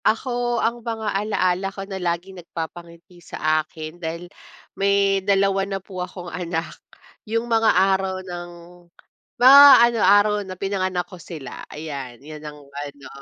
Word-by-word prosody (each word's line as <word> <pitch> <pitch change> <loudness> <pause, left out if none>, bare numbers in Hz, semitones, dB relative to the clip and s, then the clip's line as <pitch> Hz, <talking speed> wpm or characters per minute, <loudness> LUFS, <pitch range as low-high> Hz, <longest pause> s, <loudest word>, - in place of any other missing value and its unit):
Ako, 240 +1 0
ang 235 +1 -1
mga 225 -2 -3
ala-ala 195 -2 0
ko 195 0 -8
na 195 -1 -6
laging 180 +2 -3
nagpapangiti 170 +1 -9
sa 155 -1 0
akin 155 +2 -10
dahil 170 +2 -6 0.4
may 195 0 +2
dalawa 195 0 +2
na 195 - -2
po 190 -1 -8
akong 180 0 -7
anak, 170 -1 -4 0.6
yung 230 +1 0
mga 225 -1 +2
araw 190 0 +1
ng 175 -1 -7 0.9
mga 270 +3 +9 0.2
ano, 235 -1 0
araw 205 +1 +5
na 185 -2 -8
pinanganak 185 -2 -2
ko 175 0 -13
sila. 155 -5 -9
Ayan, 140 -5 -7
yan 155 0 -9
ang 150 -1 -10
ano, 140 0 -9
185 Hz, 145 wpm, -22 LUFS, 170-200 Hz, 0.9 s, mga